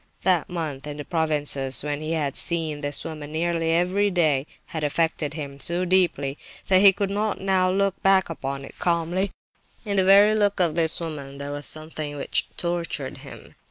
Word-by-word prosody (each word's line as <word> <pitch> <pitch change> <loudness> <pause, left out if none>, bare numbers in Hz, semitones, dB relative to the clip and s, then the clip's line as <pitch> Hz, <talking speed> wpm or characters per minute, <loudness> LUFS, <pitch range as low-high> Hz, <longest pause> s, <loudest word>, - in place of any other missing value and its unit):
That 180 -4 +2
month 155 -6 -4
in 145 0 -6
the 145 - -6
provinces, 145 -5 +1
when 145 0 -3
he 155 +1 -3
had 145 -4 -1
seen 160 -3 +1
this 145 -1 0
woman 155 -2 -7
nearly 165 +1 0
every 180 +5 +2
day, 155 -6 +1 0.2
had 160 -2 -5
affected 155 0 0
him 140 -3 -7
so 175 +5 -1
deeply 170 -7 +1 0.3
that 185 -1 +5
he 200 -1 +9
could 200 0 -2
not 210 +1 -1
now 190 -1 +2
look 195 +1 0
back 195 -1 +4
upon 140 -4 -5
it - - -12
calmly. 175 +3 0 0.6
In 200 -1 -1
the 190 - +5
very 200 +3 +6
look 205 -2 +1
of 170 -4 +3
this 160 -1 +1
woman 145 -5 -6
there 140 0 -6
was 145 0 -4
something 155 -1 -4
which - - 0
tortured 170 -6 -3
him. - - -12
165 Hz, 185 wpm, -24 LUFS, 145-185 Hz, 0.6 s, he